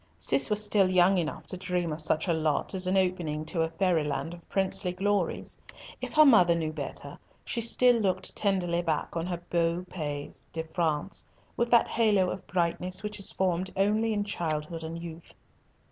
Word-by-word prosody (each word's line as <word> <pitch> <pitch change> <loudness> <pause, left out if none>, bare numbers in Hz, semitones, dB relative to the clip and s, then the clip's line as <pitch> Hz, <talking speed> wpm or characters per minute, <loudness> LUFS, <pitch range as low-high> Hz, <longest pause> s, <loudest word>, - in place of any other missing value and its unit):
Cis - - +4
was 210 0 +4
still 205 -2 +3
young 185 +1 +4
enough 160 -3 -4
to 185 - -6
dream 180 -3 -2
of 155 - -6
such 155 +2 0
a 170 - +2
lot 155 +1 -1
as 185 -1 -1
an 190 +1 +2
opening 175 -5 -1
to 165 +1 -1
a 160 - 0
fairy 175 -2 +1
land 145 +2 -3
of 170 -1 -14
princely 190 -1 0
glories. 195 -1 -1 0.5
If - - -5
her 310 0 +8
mother 180 - +6
knew 160 -2 -2
better, 140 -1 -7 0.3
she 235 - -1
still 245 +1 +4
looked 185 -2 -1
tenderly 180 -4 0
back 165 -2 -2
on 165 +1 -2
her 175 -1 -4
beau 170 +1 0
pays 145 -5 -5
de 160 - -3
France 160 +1 -2 0.3
with 235 0 0
that 235 -1 +5
halo 205 -5 +2
of 190 - -7
brightness 180 +2 -1
which 210 0 -5
is 195 - -1
formed 185 0 -1
only 215 +3 +2
in 205 -1 0
childhood 165 -4 -3
and 160 +1 -5
youth. 170 -1 -10
180 Hz, 190 wpm, -28 LUFS, 165-195 Hz, 0.5 s, her